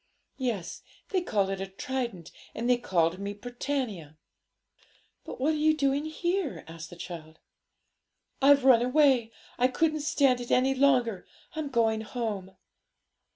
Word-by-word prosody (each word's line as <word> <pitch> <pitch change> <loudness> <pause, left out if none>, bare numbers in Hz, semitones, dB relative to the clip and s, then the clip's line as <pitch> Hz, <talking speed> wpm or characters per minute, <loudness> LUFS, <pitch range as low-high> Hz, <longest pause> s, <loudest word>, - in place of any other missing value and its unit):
'Yes; 230 -10 -3 0.3
they 375 -2 +1
called 200 - 0
it 195 -1 -3
a 195 - -3
trident, 200 -3 -4 0.2
and 235 - -2
they 250 -1 +3
called 175 -5 +1
me 200 +1 -4
Britannia.' 230 - -4 1.1
'But - - -8
what 295 +5 +2
are - - -1
you 310 +1 +3
doing 280 0 +1
here?' 345 +1 -2
asked 165 0 -9
the - - -11
child. 165 -2 -9 1.0
'I've 280 0 +6
run 250 -3 +7
away; 255 -3 +3 0.3
I 250 - +5
couldn't 310 +4 0
stand 275 -4 +2
it 240 - -7
any 260 +2 +3
longer. 255 -7 +2 0.3
I'm 310 -2 -3
going 225 -3 +1
home.' 210 -5 -5
245 Hz, 145 wpm, -28 LUFS, 195-280 Hz, 1.1 s, run